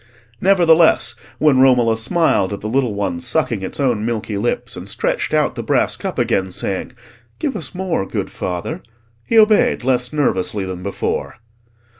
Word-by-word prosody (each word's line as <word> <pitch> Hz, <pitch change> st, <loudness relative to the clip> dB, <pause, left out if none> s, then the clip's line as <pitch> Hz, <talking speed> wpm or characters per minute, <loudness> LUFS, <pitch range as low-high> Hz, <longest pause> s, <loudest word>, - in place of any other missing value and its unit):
Nevertheless, 170 Hz, -4 st, +4 dB, 0.2 s
when 150 Hz, -4 st, +3 dB
Romola 125 Hz, -4 st, +4 dB
smiled 110 Hz, -, +1 dB
at 100 Hz, -, -6 dB
the 105 Hz, -, -4 dB
little 120 Hz, -2 st, 0 dB
one 100 Hz, -4 st, -2 dB
sucking 95 Hz, -, -1 dB
its 95 Hz, -, -4 dB
own 120 Hz, -6 st, +1 dB
milky 110 Hz, -2 st, -3 dB
lips, 105 Hz, +4 st, -2 dB
and -, -, -8 dB
stretched -, -, -1 dB
out -, -, +1 dB
the -, -, -5 dB
brass -, -, +1 dB
cup -, -, -5 dB
again, 95 Hz, -1 st, 0 dB
saying, 95 Hz, +6 st, -3 dB, 0.4 s
"Give 280 Hz, -5 st, -2 dB
us 205 Hz, -, -3 dB
more, 180 Hz, -, -2 dB
good -, -, -4 dB
father," 90 Hz, -, -4 dB, 0.4 s
he 230 Hz, -, 0 dB
obeyed 215 Hz, -, +4 dB
less 125 Hz, -1 st, +1 dB
nervously 105 Hz, -9 st, -1 dB
than 95 Hz, -1 st, -6 dB
before. 100 Hz, +1 st, -3 dB
120 Hz, 160 wpm, -19 LUFS, 100-160 Hz, 0.4 s, Nevertheless